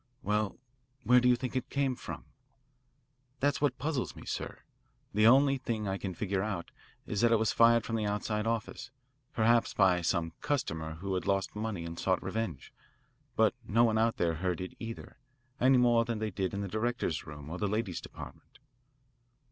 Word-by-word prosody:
"Well, 105 +1 0 0.5
where 125 +1 +6
do 125 0 +3
you 125 - +6
think 125 +2 -5
it 130 - -2
came 140 -2 0
from?" - - -8 1.1
"That's 145 +1 +1
what 145 - +1
puzzles 145 -1 -2
me, - - -11
sir. - - -5 0.5
The 105 +2 +5
only 135 +2 +5
thing 115 -5 -3
I 95 0 -2
can 95 -3 -4
figure 100 -1 -1
out 100 -4 -4 0.3
is 105 - -2
that 120 -1 +4
it 115 - +5
was 110 0 +1
fired 115 0 +5
from 115 - -1
the 105 -1 -1
outside 105 +1 -1
office 115 +2 -3 0.4
perhaps 115 +1 +2
by 95 -3 +4
some 85 -1 0
customer 80 - -2
who 95 +4 -4
had 90 - -2
lost 95 0 0
money 105 -5 -3
and 85 0 -6
sought - - +1
revenge. 110 -11 -4 0.6
But - - +4
no 115 +3 +4
one 110 -2 +3
out 115 0 +2
there 85 -1 +1
heard 90 +1 -2
it 90 0 -5
either, 115 0 -8 0.4
any 130 +1 +5
more 120 -1 +4
than 115 -1 -3
they 110 0 -2
did 95 +1 -2
in 100 - -2
the 100 - -3
directors' 110 -6 -2
room 75 0 -9
or 90 - -5
the 105 - 0
ladies' 105 -3 -2
department." - - -11
110 Hz, 190 wpm, -31 LUFS, 95-120 Hz, 1.1 s, where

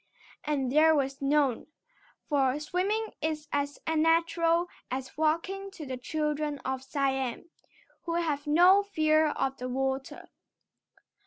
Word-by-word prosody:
And 275 -4 -1
there 315 +2 +5
was 275 -1 -1
none, 275 -3 +1 0.6
for 275 -2 +1
swimming 390 +8 -1
is 310 -1 -2
as 285 0 -1
natural 330 +2 +2 0.2
as 260 +1 -5
walking 335 +6 -1
to 315 - -8
the 260 -1 -4
children 300 +2 -2
of 265 0 -2
Siam, 270 +2 -2 0.5
who 335 -1 -2
have 305 -4 -1
no 355 +6 +6
fear 310 -5 +2
of 270 -2 -2
the 255 -1 -5
water. 265 +1 -3
300 Hz, 125 wpm, -29 LUFS, 270-330 Hz, 0.6 s, no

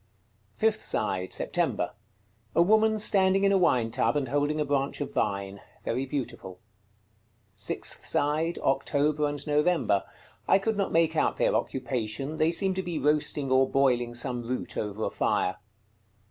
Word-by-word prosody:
Fifth 220 0 +1
side. 95 -3 -1
September. - - -1 0.6
A - - +5
woman 220 +3 +3
standing 195 -2 +3
in 200 - +4
a 195 - +4
wine 120 -10 +2
tub, 115 +4 +1
and 135 -4 -2
holding 145 +2 0
a 150 - +1
branch 140 -1 -1
of 145 - -4
vine. 100 0 -2 0.2
Very 130 +4 -1
beautiful. 120 -9 -5 0.9
Sixth 105 0 -4
side. 155 +4 0
October 145 +2 +1
and 145 -1 -5
November. 150 - +2 0.4
I - - +6
could 220 +3 -1
not 200 -1 -1
make 165 0 +2
out - - +1
their - - +2
occupation; 130 +3 -2
they 155 0 +3
seem 190 +2 +1
to 190 - -2
be 175 -3 -4
roasting 145 -1 0
or 130 0 +4
boiling 125 -3 +1
some 125 0 -2
root 125 +2 -4
over 105 +1 -3
a - - -1
fire. 90 - 0
145 Hz, 155 wpm, -27 LUFS, 120-165 Hz, 0.9 s, I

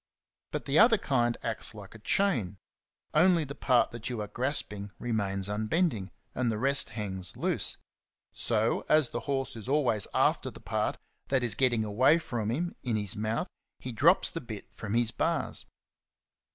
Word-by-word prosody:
But - - -4
the 140 +2 +3
other 225 0 +7
kind 120 - 0
acts 110 0 -3
like 100 -3 -10
a 115 - -12
chain; 110 - 0 0.6
only 170 +1 +4
the 140 -1 -7
part 125 -3 +2
that 120 +2 -5
you 120 -3 -4
are 105 - -4
grasping 105 -5 -2
remains 100 -5 -2
unbend 110 - +1
ing, 95 -3 -6 0.2
and 125 -2 0
the 110 - -2
rest 135 +1 +4
hangs 95 -4 -3
loose. - - +2 0.6
So, 110 -1 0
as 155 -5 +4
the 120 - -3
horse 135 -2 -1
is 115 +2 -7
always 130 -9 +1
after - - +2
the - - -12
part - - -2 0.3
that 135 -2 +1
is 120 -4 +2
getting 120 -2 +2
away 130 +9 +4
from 120 -9 -3
him 170 +9 -2
in 120 -3 -1
his 105 -3 -1
mouth, 110 +2 -1 0.3
he 125 - -6
drops 155 - +4
the 165 - -5
bit 110 -5 -9
from 110 0 -4
his 120 -1 +3
bars. - - -1
120 Hz, 175 wpm, -29 LUFS, 105-140 Hz, 0.6 s, other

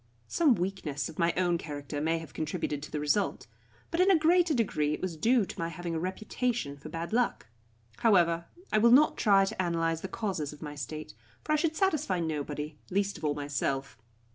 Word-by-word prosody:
Some 300 -8 +4
weakness 175 -7 -3
of 155 - -11
my 170 0 +3
own 175 -2 +2
character 145 -1 -5
may 165 +2 +1
have 160 -1 -9
contributed 155 -2 -3
to 150 - -7
the 150 - -2
result, 150 +8 0 0.5
but 335 - -1
in 370 +2 +5
a 380 - +6
greater 335 +2 +4
degree 150 -10 +1
it - - -10
was 185 -3 -3
due 230 +7 +3
to - - -9
my 165 - -1
having 170 +1 -5
a 160 - -1
reputation 200 - -2
for 140 - -10
bad 165 +5 -5
luck. 245 +1 +1 0.5
However, 170 -6 +3 0.3
I 215 - +5
will 235 +2 +6
not 275 +6 +6
try 195 -2 +4
to 195 -2 -2
analyse 165 -2 0
the - - -4
causes 185 -8 -3
of 150 - -13
my 150 -1 -5
state, 150 -1 -6 0.3
for - - -3
I - - +5
should 315 +1 0
satisfy 310 - +1
nobody, 150 -2 -3
least 200 +1 0
of - - -17
all 150 -1 +1
myself. 140 -1 -2
170 Hz, 205 wpm, -30 LUFS, 150-220 Hz, 0.5 s, a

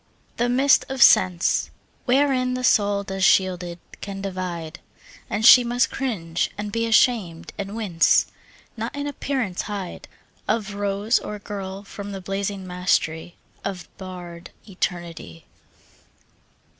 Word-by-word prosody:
The 240 +1 +1
mist 265 +3 +4
of 265 -2 +4
sense, 180 -2 +4 0.4
Wherein 255 -1 +2
the 255 - -4
soul 205 -4 +3
goes 195 -1 -4
shielded, 180 -2 +2 0.2
can 200 -1 -6
divide, 180 -4 -5 0.5
And 215 +1 -1
she 250 - +10
must 245 +1 +1
cringe 175 -11 -2
and 205 0 -4
be 230 +2 -1
ashamed, 220 -7 +2
and 200 0 -5
wince, 195 -7 +3 0.5
Not 230 +4 -5
in 285 0 -3
appearance 265 -9 -2
hide 200 -4 -6 0.4
Of 210 -2 -1
rose 205 +2 0
or 210 - -6
girl 200 -1 -7
from 200 0 -8
the 195 - -5
blazing 195 +1 -3
mastery 180 -2 -1 0.3
Of 190 -3 -5
bared 180 -2 -9 0.2
Eternity. 170 - -5
200 Hz, 125 wpm, -23 LUFS, 180-230 Hz, 0.5 s, she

